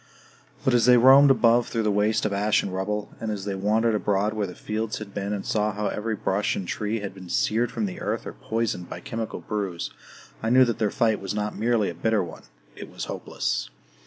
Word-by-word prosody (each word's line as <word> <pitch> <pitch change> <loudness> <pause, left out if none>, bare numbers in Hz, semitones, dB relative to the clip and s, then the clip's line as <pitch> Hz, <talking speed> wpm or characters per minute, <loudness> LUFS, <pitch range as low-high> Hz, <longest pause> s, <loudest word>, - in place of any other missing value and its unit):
But 130 - +3
as 120 0 +4
they 125 0 +8
roamed 135 +4 +8
above 120 -2 +4
through 115 -1 -1
the 105 - +2
waste 105 +2 +1
of 105 - 0
ash 105 +2 +2
and 95 - -4
rubble, 105 +2 -3
and 110 - -3
as 100 -2 -4
they 100 - -2
wandered 110 +4 +1
abroad 105 0 +1
where 105 -2 -1
the 90 - -9
fields 110 0 -3
had 105 -2 -8
been 100 0 -3
and 100 -2 -3
saw 105 0 +1
how 105 +1 -1
every 110 +1 -2
brush 100 0 0
and 95 - -4
tree 105 +3 -2
had 100 -2 -5
been 95 -2 -11
seared 110 - +1
from 110 -2 -2
the 95 - -6
earth - - -2
or - - -6
poisoned 110 -6 -3
by - - -6
chemical 115 -1 -5
brews, 100 -5 -3 0.5
I - - -1
knew 130 +2 +6
that 115 -2 -2
their 110 -2 +2
fight 110 -1 +1
was 95 +1 -4
not 105 0 -2
merely 115 -2 +1
a - - -8
bitter 110 +4 +1
one 85 -2 -10 0.3
it - - -9
was - - -5
hopeless. - - -3
105 Hz, 230 wpm, -25 LUFS, 100-115 Hz, 0.5 s, they